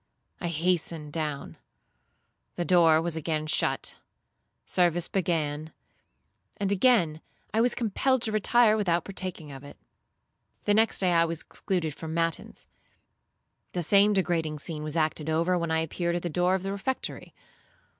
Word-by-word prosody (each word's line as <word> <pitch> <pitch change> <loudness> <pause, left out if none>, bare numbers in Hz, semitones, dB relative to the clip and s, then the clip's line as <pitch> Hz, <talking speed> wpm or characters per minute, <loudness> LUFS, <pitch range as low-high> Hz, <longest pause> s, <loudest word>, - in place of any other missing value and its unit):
I 175 - -3
hastened 165 -2 -1
down. 150 -3 -4 1.0
The 175 - -2
door 165 -3 +5
was 170 -1 -2
again 155 -1 -2
shut; 155 - 0 0.7
service 175 -1 +1
began; 160 -4 -1 0.8
and 200 -1 -1
again 190 -7 +3 0.3
I 220 - +3
was 245 +1 +2
compelled 245 +3 +1
to 220 - +1
retire 215 +1 +4
without 175 -5 0
partaking 185 -6 -6
of 135 0 -10
it. 145 - -12 0.9
The 205 - +2
next 225 +2 +3
day 185 -2 +1
I 170 -1 +4
was 165 -1 -3
excluded 170 -6 -3
from 160 +1 -6
matins; 165 -1 -2 1.1
the 175 - -1
same 200 +4 +5
degrading 165 -5 0
scene 155 +1 -5
was 155 +1 -4
acted 155 -1 0
over 165 +3 +2
when 170 -2 -1
I 160 0 +1
appeared 170 +2 -2
at 175 - -3
the 175 - -2
door 180 +3 +2
of 190 - -3
the 195 - -3
refectory. 200 +7 -4
170 Hz, 150 wpm, -27 LUFS, 160-195 Hz, 1.1 s, door